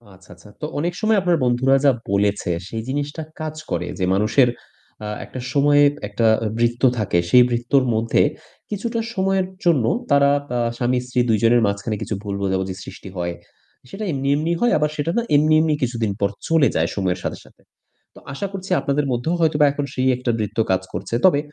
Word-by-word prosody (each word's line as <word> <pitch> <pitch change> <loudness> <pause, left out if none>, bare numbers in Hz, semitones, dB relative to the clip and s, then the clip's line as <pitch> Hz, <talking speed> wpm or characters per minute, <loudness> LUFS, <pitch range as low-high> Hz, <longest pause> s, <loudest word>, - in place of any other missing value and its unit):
আচ্ছা, 95 - -21
আচ্ছা। 95 +4 -17
তো - - -2
অনেক 175 +3 -1
সময় 215 -1 +3
আপনার 175 -2 +2
বন্ধুরা 125 +2 +3
যা 140 - +7 0.2
বলেছে 100 -2 +1 0.2
সেই 110 -1 -4
জিনিসটা 145 +3 -3 0.2
কাজ 155 0 -4 0.2
করে। 90 +1 -1
যে 90 - +1
মানুষের 110 +6 +3 0.6
আ - - -4 0.2
একটা 130 - -8
সময়ে 145 0 +4 0.3
একটা 110 +3 -1 0.2
আ - - 0
বৃত্ত 120 +1 0 0.2
থাকে। 100 -5 +1
সেই 125 -1 +7
বৃত্তর 120 +3 +2
মধ্যে 115 +1 +2 0.5
কিছুটা 230 +3 -3
সময়ের 190 -1 +1 0.2
জন্য 145 -10 +3 0.3
তারা 140 0 +5 0.2
তা 125 -1 -1 0.2
স্বামী-স্ত্রী 125 0 -1
২ 110 - +4
জনের 120 +1 +5
মাঝখানে 100 +2 -2
কিছু 110 - -3
ভুল 100 -1 -4
বোঝাবুঝি 95 -1 -1
সৃষ্টি 95 - -10
হয়। 85 0 -2 0.6
সেটা 205 +9 -6
এমনি, 135 -1 -2
এমনি 160 +3 -1
হয়। 240 - +3
আবার 150 0 +1
সেটা 155 +3 -1
না - - +3
এমনি, 155 +2 +4
এমনি 155 -1 +1
কিছুদিন 115 -4 -1
পর 100 0 +1 0.2
চলে 160 -4 +4
যায় 80 +1 +1
সময়ের 95 -3 -1
সাথে, - - -3
সাথে। - - -22 0.5
তো - - -12
আশা 200 +8 -3
করছি 190 -1 -7
আপনাদের 140 0 0
মধ্যেও 125 +8 -1
হয়তোবা 150 -2 +3
এখন 145 0 -3
সেই 130 0 0
একটা 125 -1 -1
বৃত্ত 105 +1 -4
কাজ 95 0 +2
করছে। 115 - -4
তবে 175 -6 +5
125 Hz, 190 wpm, -21 LUFS, 110-150 Hz, 0.6 s, যা